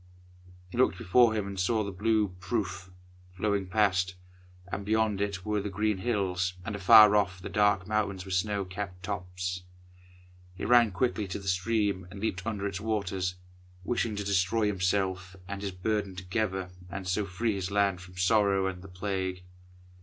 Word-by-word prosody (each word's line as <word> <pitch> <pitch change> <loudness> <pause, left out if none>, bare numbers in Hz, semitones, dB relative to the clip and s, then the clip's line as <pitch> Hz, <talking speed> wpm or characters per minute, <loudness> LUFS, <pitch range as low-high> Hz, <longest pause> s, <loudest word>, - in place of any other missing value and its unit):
He 120 - -4
looked 125 -7 +3
before 110 +5 +4
him 105 -2 -1
and 100 -1 -6
saw 110 +4 +1
the 100 - -4
blue 105 +1 +1
Pruth 95 -1 -3 0.5
flowing 100 -1 0
past, 90 -2 +2 0.6
and 100 - -3
beyond 110 -1 +1
it 100 -3 -2
were 105 -1 0
the 100 - -4
green 105 0 0
hills, 95 -5 0
and 105 -2 -3
afar 105 +1 +8
off 90 -3 +1
the 90 - -7
dark 105 -3 +2
mountains 100 -3 -1
with 95 - -5
snow 100 +1 0
capped 90 -1 -6
tops. 90 -2 -4 0.9
He - - -5
ran 120 -1 +6
quickly 105 +2 0
to 95 - -4
the 100 - -9
stream 95 0 0
and 100 - -9
leaped 95 -3 -2
under 100 -2 -2
its 100 0 -3
waters, 95 -4 -1 0.5
wishing 115 +1 -1
to 100 - -3
destroy 100 +2 +1
himself 95 -1 0
and 100 0 -5
his 100 - -2
burden 100 +1 -2
together, 95 0 -2 0.2
and 95 +1 -6
so 95 +3 +1
free 110 +4 -1
his 95 -2 -3
land 100 -3 +1
from 90 0 -13
sorrow 100 0 +3
and 95 -2 -3
the 95 - -11
Plague. 95 -1 -3
100 Hz, 170 wpm, -29 LUFS, 90-105 Hz, 0.9 s, afar